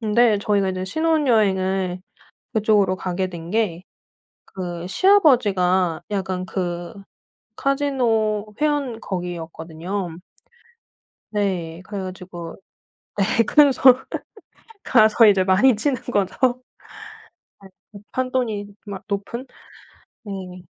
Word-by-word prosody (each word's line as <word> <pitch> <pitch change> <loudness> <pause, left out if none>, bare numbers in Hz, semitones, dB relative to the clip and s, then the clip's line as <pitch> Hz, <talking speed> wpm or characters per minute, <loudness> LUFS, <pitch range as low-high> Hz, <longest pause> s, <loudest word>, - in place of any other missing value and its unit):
근데 220 -1 +3
저희가 200 -2 +1
이제 185 0 -4
신혼여행을 195 - +1 0.5
그쪽으로 205 -3 +3
가게 185 0 -2
된 170 -2 -9
게 190 -5 -1 0.7
그 175 -2 -5
시아버지가 195 - +3
약간 190 -2 -2
그 175 -2 -4 0.7
카지노 230 -7 0
회원 285 -6 0
거기였거든요. 175 0 -5 1.1
네. 185 -5 -2
그래 200 -2 -5
가지고 180 -2 -8 0.6
네. 210 +3 +2
그래서 285 -1 +4 1.0
가서 220 +1 +5
이제 195 -2 +4
많이 210 +6 +4
치는 260 +1 0
거죠. 205 -6 -1 1.3
예. - - -12 0.2
그 200 - -10
판돈이 250 -5 -1 0.2
막 195 -2 -7
높은 210 +6 -4 0.8
네. 185 -3 -8
200 Hz, 200 characters per minute, -22 LUFS, 185-230 Hz, 1.3 s, 가서